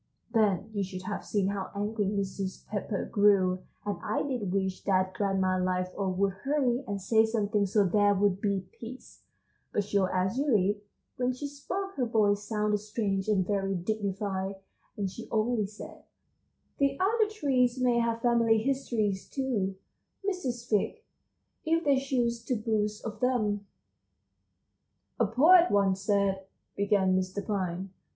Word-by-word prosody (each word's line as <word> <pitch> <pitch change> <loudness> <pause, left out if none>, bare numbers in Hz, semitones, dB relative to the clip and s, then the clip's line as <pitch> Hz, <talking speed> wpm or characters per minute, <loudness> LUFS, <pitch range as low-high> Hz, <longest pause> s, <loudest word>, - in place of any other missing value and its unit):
Then 215 -2 +2
you 200 -2 0
should 185 -1 -6
have 205 +2 -4
seen 200 -2 0
how 200 -1 -3
angry 205 0 -1
Mrs. 195 -1 -3
Pepper 205 -1 -3
grew 195 -3 +3 0.2
and 205 -4 -2
I - - -1
did 245 -9 -2
wish 190 -1 -1
that 185 -1 +2
Grandma 190 -1 +1
Liveoak 185 +1 -1
would 195 0 +2
hurry 270 -3 +1
and 200 -1 -2
say 220 +4 +4
something 210 -2 +1
so 205 +1 +3
there 205 +2 +3
would 200 -1 +1
be 195 -3 -1
peace; 245 +3 -10 0.5
but 205 - +1
sure 200 -2 +1
as 190 +6 0
you 290 - 0
live, 205 -5 +3 0.4
when 255 0 +1
she 255 +4 -6
spoke 375 +8 -4
her 250 -3 +1
voice 205 -3 +2
sounded 210 -1 0
strange 205 -2 -2
and 195 -4 +2
very 195 0 0
dignified, 195 0 -2 0.4
and 200 -2 -1
she 225 +5 -8
only 220 -1 +1
said: 210 +1 -11 0.8
"The 275 -1 +1
other 425 +3 +2
trees 260 - +1
may 245 -1 +3
have 230 0 -1
family 230 -2 +4
histories 220 -5 -1
too, 225 -9 -1 0.5
Mrs. 250 -12 -2
Fig, 225 - 0 0.6
if 330 +1 +1
they 280 -3 +3
chose 240 -4 -1
to 250 - 0
boast 210 -1 -1
of 215 -2 -5
them!" 215 -5 0 1.5
"A 230 - +3
poet 335 - +6
once 195 -1 +2
said," 200 -1 +1 0.3
began 200 -2 +2
Mr. 185 +2 -2
Pine. 190 -2 -2
210 Hz, 150 wpm, -29 LUFS, 195-240 Hz, 1.5 s, poet